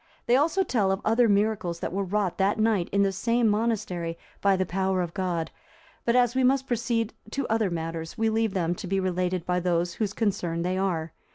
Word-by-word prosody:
They 240 - +4
also 320 +8 +3
tell 210 - +1
of 195 - 0
other 230 +1 +4
miracles 200 -4 +1
that - - -4
were 200 +1 0
wrought 195 -1 -1
that 195 +2 +2
night 215 -5 +1
in 200 0 +3
the 195 - +2
same 230 +4 +1
monastery 205 -6 -1 0.2
by 200 -1 +4
the 185 0 0
power 190 +1 0
of 170 -1 -6
God; 180 -4 -2 0.5
but 235 - +2
as 245 -1 +4
we 260 0 +1
must 265 +1 +3
proceed 235 -2 -1 0.2
to 275 +4 -2
other 220 -3 +2
matters, 165 +1 -4
we 225 0 +1
leave 220 -2 0
them 175 -2 +1
to 180 - -7
be 195 +1 0
related 180 -1 -1
by 180 0 +1
those 175 -1 0
whose 205 0 -2
concern 180 -7 -1
they 180 +1 -1
are. 170 -4 -1
195 Hz, 210 wpm, -26 LUFS, 180-225 Hz, 0.5 s, They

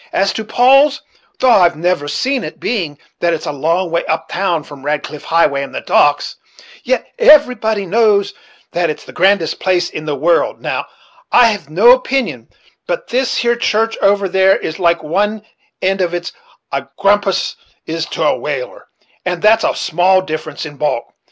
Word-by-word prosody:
As 195 0 +1
to 220 - -4
Paul's, 270 +6 +3 0.3
thof 245 -6 +4
I've 175 -1 +3
never 170 -2 -1
seen 255 - -1
it, - - -8
being 175 -11 -3 0.2
that 170 -1 +1
it's 160 - -7
a - - -2
long 165 +5 -1
way 170 - 0
up 160 0 -2
town 175 -4 -1
from 145 -2 -13
Radcliffe 150 0 -4
Highway 165 -4 +2
and 140 - -7
the - - -3
docks, 145 0 +1 0.5
yet - - -1
everybody 250 - +4
knows 200 0 +2 0.4
that 170 -1 0
it's 155 - -5
the - - -11
grandest 185 -3 +1
place 180 -2 0
in 155 - -6
the 150 -2 -2
world 165 +4 +1
Now, - - -3 0.4
I've 220 - +3
no 200 +10 +5
opinion 260 +1 0 0.4
but - - -3
this 255 +1 0
here 235 0 +1
church 225 -1 0
over 200 0 +2
there 190 +1 +3
is 160 - -5
as - - -12
like 170 -2 +1
one 205 +7 -1 0.4
end 190 +1 +1
of 175 -1 -1
it 175 - -5
as - - -26 0.4
a - - -3
grampus 200 -1 +1 0.3
is 165 0 -3
to - - -3
a - - +2
whale; - - -5 0.4
and 180 -1 -2
that's 220 +1 +4
only - - +1
a - - -7
small 185 +2 +2
difference 155 -3 -5
in 145 -2 -10
bulk. 150 -5 -2
185 Hz, 185 wpm, -16 LUFS, 160-220 Hz, 0.5 s, no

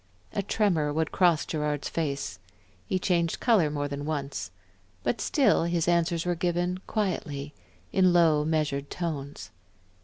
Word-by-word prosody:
A 200 - 0
tremor 180 -7 +1
would 160 +1 -1
cross 175 -5 +3
Gerard's 150 -2 -2
face, 140 - -3 0.5
he 185 - +1
changed 170 -2 0
color 210 -11 +3
more 145 -1 -2
than 140 0 -5
once. 140 -10 -3 0.5
But 225 - -1
still 270 - +3
his 170 -1 0
answers 170 -1 +2
were 175 - +1
given 175 +1 -1
quietly, 150 -9 -2 0.4
in 185 -2 +5
low, 165 -4 +4
measured 150 -3 -1
tones. 150 -5 -5
165 Hz, 135 wpm, -27 LUFS, 145-175 Hz, 0.5 s, in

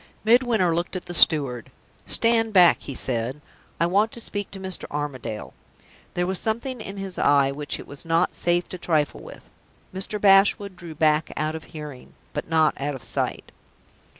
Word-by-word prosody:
Midwinter 225 -6 +3
looked 170 +3 -3
at 185 - -5
the 175 - -7
steward. 140 -9 +3 0.4
"Stand 225 -1 +3
back," 180 -3 +6
he 140 - -7
said. 125 +3 -2 0.4
"I 170 - +3
want 205 +6 +2
to - - -5
speak 205 -3 -4
to 195 - -9
Mr. 190 -1 -2
Armadale." 140 -7 -5 0.6
There 175 - 0
was 190 0 -2
something 235 +2 -3
in 200 -1 -7
his 195 -2 -4
eye 140 -1 +4
which 145 +1 -4
it - - -9
was 140 - -10
not 165 0 +1
safe 175 0 0
to 185 - -7
trifle 155 -4 0
with. - - -12 0.5
Mr. 195 +3 -3
Bashwood 195 0 +4
drew 170 -3 -10
back 155 0 +2
out 155 +1 -1
of 160 0 -7
hearing, 150 -5 -10 0.2
but - - -5
not 160 -3 +2
out 145 0 -2
of 130 - -10
sight. - - -2
175 Hz, 175 wpm, -24 LUFS, 150-195 Hz, 0.6 s, back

